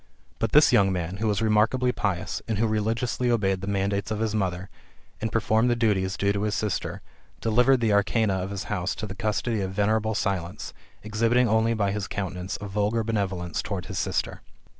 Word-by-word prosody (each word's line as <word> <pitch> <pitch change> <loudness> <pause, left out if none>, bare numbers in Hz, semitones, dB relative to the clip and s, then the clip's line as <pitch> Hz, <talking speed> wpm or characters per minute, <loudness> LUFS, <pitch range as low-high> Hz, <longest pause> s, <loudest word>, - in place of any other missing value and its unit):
But - - 0
this - - +6
young 95 -1 +5
man, 90 0 -3
who 110 +2 -1
was 105 +1 +1
re 110 - +2
markably 125 +4 +2
pious, 95 -4 -2
and 110 -3 -1
who 115 - +2
religiously 115 +3 0
obeyed 95 -5 +1
the 95 - -5
mandates 100 +1 -1
of 110 - -2
his 110 -1 -1
mother, 95 -3 -1 0.5
and 110 0 -2
performed 110 +1 +2
the 120 - +3
duties 100 -5 +1
due 100 0 +1
to 100 - -2
his 105 0 0
sister, 105 -3 -2 0.4
delivered 125 +3 +3
the 110 -3 +2
arcana 100 +1 +2
of 95 0 -2
his 100 -1 -4
house 90 -3 -2
to 110 - -5
the 100 - -6
custody 110 +1 -1
of 95 0 -3
venerable 110 +2 +1
Silence, 95 -5 -3 0.3
exhibiting 115 +4 +2
only 110 +1 +2
by 100 -2 +1
his 100 -1 -3
countenance 95 -2 -4
a 100 - -6
vulgar 105 +3 0
bene 105 -3 0
volence 90 -2 -4
towards 95 -3 -5
his 95 -2 -3
sister. 95 0 -2
105 Hz, 205 wpm, -26 LUFS, 95-110 Hz, 0.5 s, this